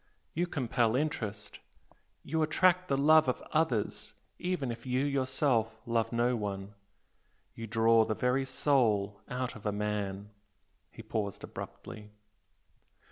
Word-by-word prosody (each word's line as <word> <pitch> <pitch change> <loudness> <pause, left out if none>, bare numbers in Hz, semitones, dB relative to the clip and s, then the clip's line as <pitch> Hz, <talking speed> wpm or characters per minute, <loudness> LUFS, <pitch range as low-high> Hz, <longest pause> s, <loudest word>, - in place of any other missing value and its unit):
you 175 +3 0
compel 120 -6 +1
interest 115 -8 -3 0.6
you 160 +2 -1
attract 180 +3 +3
the 135 - +1
love 155 +1 +6
of 125 - -1
others 145 -10 0 0.2
even 180 -9 -1
if 115 0 -8
you 130 +2 0
yourself 130 -5 0
love 115 -1 0
no 120 +1 +2
one 100 -2 -4 0.8
you 115 - -7
draw 115 +1 +4
the 110 0 -1
very 125 +3 +1
soul 110 -7 +1
out 125 0 -3
of 110 - -11
a 105 - 0
man 105 -1 -3 0.3
" - - -44
He 115 - -11
paused, 110 -3 -3
abruptly. 105 -1 -8
120 Hz, 135 wpm, -31 LUFS, 105-140 Hz, 0.8 s, love